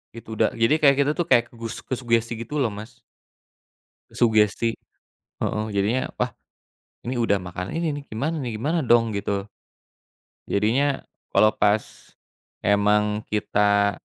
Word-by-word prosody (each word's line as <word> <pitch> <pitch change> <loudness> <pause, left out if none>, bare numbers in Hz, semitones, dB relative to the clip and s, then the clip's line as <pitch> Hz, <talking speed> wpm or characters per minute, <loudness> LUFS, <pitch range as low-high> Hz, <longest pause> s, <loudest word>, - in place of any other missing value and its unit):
Gitu, 115 - -11
da - - +5
jadi 115 +3 +3
kayak 140 -2 +6
kita, 140 +1 +3
tuh, 175 - +2
kayak 120 - +6
ke - - -26
gus 115 0 -5
kesugesti, 120 -2 0
gitu, 145 +6 -5
loh, 120 -5 +1
Mas. 110 +4 -10 1.1
Sugesti, 110 0 +2 0.6
heeh. 105 0 -1
Jadinya, 105 +6 0
"Wah, - - -1 0.7
ini 125 +1 -3
udah 115 -3 +2
makan 90 +1 -6
ini, 165 -1 0
nih, 145 0 -6
gimana, 150 +9 -2
nih, 120 -5 -4
gimana 150 +10 0
dong?" 120 -5 +3
Gitu, 100 -1 -2 1.0
jadinya 130 +8 +1 0.3
kalau 110 - +6
pas 105 +1 0 0.5
emang 105 +1 +2
kita, 100 -1 +1
115 Hz, 135 wpm, -24 LUFS, 105-130 Hz, 1.1 s, kayak